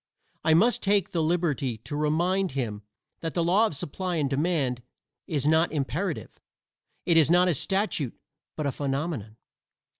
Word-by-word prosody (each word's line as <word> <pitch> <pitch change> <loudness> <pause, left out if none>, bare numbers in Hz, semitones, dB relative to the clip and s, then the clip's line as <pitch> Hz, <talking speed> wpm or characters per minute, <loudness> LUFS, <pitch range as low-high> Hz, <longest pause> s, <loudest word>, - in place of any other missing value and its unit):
I 160 0 +4
must 230 +9 +3
take 200 -1 +2
the 170 -4 0
liberty 155 -7 0
to 115 +6 -7
remind 170 +4 +1
him 115 -6 -3 0.4
that 165 -1 -4
the 170 - +2
law 195 +7 +4
of 160 - -6
supply 180 +6 -3
and 150 -4 +1
demand 140 -3 0 0.5
is 145 -4 -1
not 160 +2 +3
imperative; 155 +4 -3 0.7
it 170 -2 +4
is 160 -2 +5
not 180 +1 +5
a 180 - +3
statute 190 - -1 0.4
but 155 - -3
a 140 - +1
phenomenon. 135 -6 -3
160 Hz, 155 wpm, -27 LUFS, 140-180 Hz, 0.7 s, is